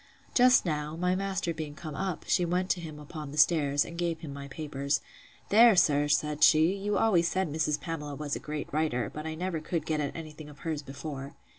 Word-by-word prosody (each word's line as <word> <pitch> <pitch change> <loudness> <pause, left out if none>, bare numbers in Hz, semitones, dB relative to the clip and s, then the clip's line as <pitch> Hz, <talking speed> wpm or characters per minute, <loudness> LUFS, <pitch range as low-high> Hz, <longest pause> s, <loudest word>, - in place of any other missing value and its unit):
Just 250 -2 +5
now, 150 -2 -2
my 180 +2 +1
master 190 -3 -2
being 155 -2 -6
come 155 -1 -7
up, 185 +2 -3
she 180 - +3
went 180 +2 0
to 180 - -1
him 155 -3 -8
upon 150 0 -8
the 150 - -8
stairs, 145 -3 +3
and 170 - -8
gave 170 -2 -1
him 150 -4 -7
my 140 0 -7
papers. 140 -2 -2 0.5
There, 225 +1 +7
sir, 145 -5 +4
said 150 +1 +1
she; 160 +3 +6
you 205 +1 -1
always 180 -7 +3
said 185 -5 -1
Mrs. 150 -1 0
Pamela 150 -3 -5
was 145 0 -3
a - - -4
great 150 -1 -5
writer; 135 -8 0
but 155 +1 -5
I 160 - -4
never 175 0 -2
could 160 +2 -3
get 155 -1 -1
at 145 -1 -2
any 160 -2 -7
thing 150 0 -11
of 145 - -15
hers 155 -3 -2
before. 140 0 -7
155 Hz, 225 wpm, -29 LUFS, 150-175 Hz, 0.5 s, There